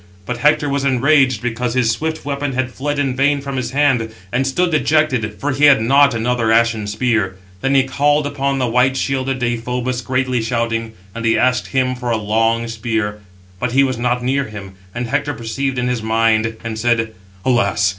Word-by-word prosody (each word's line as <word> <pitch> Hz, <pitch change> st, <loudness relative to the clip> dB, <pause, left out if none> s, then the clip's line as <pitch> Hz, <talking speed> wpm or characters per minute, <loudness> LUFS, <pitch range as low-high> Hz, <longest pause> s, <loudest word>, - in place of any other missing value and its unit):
But 125 Hz, -, -3 dB
Hector 150 Hz, +2 st, +3 dB
was 140 Hz, -1 st, -1 dB
enraged 130 Hz, -2 st, +3 dB
because 120 Hz, 0 st, -2 dB
his 120 Hz, -3 st, +2 dB
swift 160 Hz, +7 st, -3 dB
weapon 140 Hz, -1 st, -2 dB
had 130 Hz, 0 st, -1 dB
fled 145 Hz, +3 st, -3 dB
in 135 Hz, -3 st, 0 dB
vain 140 Hz, +2 st, +2 dB
from 140 Hz, 0 st, -5 dB
his 125 Hz, -2 st, -2 dB
hand; 130 Hz, -5 st, +1 dB, 0.2 s
and 130 Hz, +4 st, 0 dB
stood 175 Hz, +6 st, +1 dB
dejected, 150 Hz, -8 st, +1 dB
for 145 Hz, -, -1 dB
he 140 Hz, +3 st, +3 dB
had 140 Hz, -4 st, +7 dB
not 140 Hz, +3 st, +4 dB
another 115 Hz, 0 st, 0 dB
ashen 115 Hz, -2 st, +2 dB
spear. 105 Hz, -3 st, 0 dB, 0.3 s
Then 135 Hz, +1 st, +1 dB
he 135 Hz, -, +5 dB
called 145 Hz, +3 st, +1 dB
upon 140 Hz, -1 st, -1 dB
the 130 Hz, -, 0 dB
white 125 Hz, +3 st, +2 dB
shielded 135 Hz, -1 st, -1 dB
Deïphobus, 125 Hz, +1 st, -2 dB
greatly 130 Hz, -1 st, 0 dB
shouting, 115 Hz, -1 st, -2 dB, 0.2 s
[and] 115 Hz, +1 st, -6 dB
he 115 Hz, -1 st, +2 dB
asked 125 Hz, 0 st, +1 dB
him 130 Hz, -1 st, 0 dB
for 125 Hz, -1 st, -5 dB
a 115 Hz, -, +1 dB
long 115 Hz, +2 st, 0 dB
spear; 110 Hz, -2 st, -2 dB, 0.4 s
but 125 Hz, +2 st, -2 dB
he 135 Hz, +1 st, +5 dB
was 130 Hz, -3 st, -1 dB
not 125 Hz, 0 st, 0 dB
near 135 Hz, +2 st, 0 dB
him; 100 Hz, -3 st, -9 dB, 0.2 s
and 120 Hz, +1 st, -2 dB
Hector 145 Hz, +3 st, -1 dB
perceived 130 Hz, +4 st, -3 dB
in 125 Hz, 0 st, 0 dB
his 125 Hz, -2 st, -1 dB
mind, 110 Hz, 0 st, +1 dB
and 110 Hz, -1 st, -4 dB
said: 115 Hz, -1 st, +1 dB, 0.3 s
"Alas! 100 Hz, -6 st, +2 dB
125 Hz, 195 wpm, -18 LUFS, 115-135 Hz, 0.4 s, had